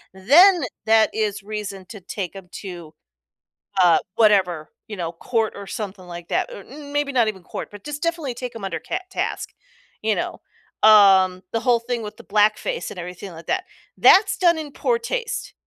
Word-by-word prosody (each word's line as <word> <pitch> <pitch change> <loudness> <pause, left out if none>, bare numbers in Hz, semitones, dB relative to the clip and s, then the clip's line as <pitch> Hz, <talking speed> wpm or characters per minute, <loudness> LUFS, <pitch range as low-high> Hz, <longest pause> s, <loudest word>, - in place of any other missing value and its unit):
then 325 - +6 0.2
that 220 0 +4
is 210 -2 -2
reason 205 -2 -6
to 210 -2 -10
take 185 0 -6
'em 190 -2 -11
to, 175 -5 -9 0.9
uh, 175 -2 +6 0.2
whatever, 190 -8 +2 0.2
you 215 - -6
know, 170 -3 -4
court 225 +6 -1
or 200 - -8
something 195 -3 -6
like 175 -1 -9
that, - - -1
or, - - -9
um, - - -18
or - - -10 0.2
maybe 290 -1 0
not 240 -4 +2
even 200 -3 -4
court, - - -7
but 205 -1 -12
just 295 +1 -6
definitely 330 -7 -2
take 250 0 -6
them 225 - -9
under 180 -4 -3
cat 370 - -5
task. - - -3 0.5
You - - +2
know? - - -4 0.4
Um, 195 -3 +6
the 230 - -1
whole 245 -2 +3
thing 235 0 -4
with 210 +1 -8
the - - -13
blackface 215 - +1
and 185 - -8
everything 180 +2 -8
like 165 0 -12
that. 370 0 -1 0.3
That's 395 +1 +6
done 345 -2 +3
in 300 -2 -7
poor 470 +10 0
taste 470 0 -4
215 Hz, 190 wpm, -22 LUFS, 190-280 Hz, 0.9 s, then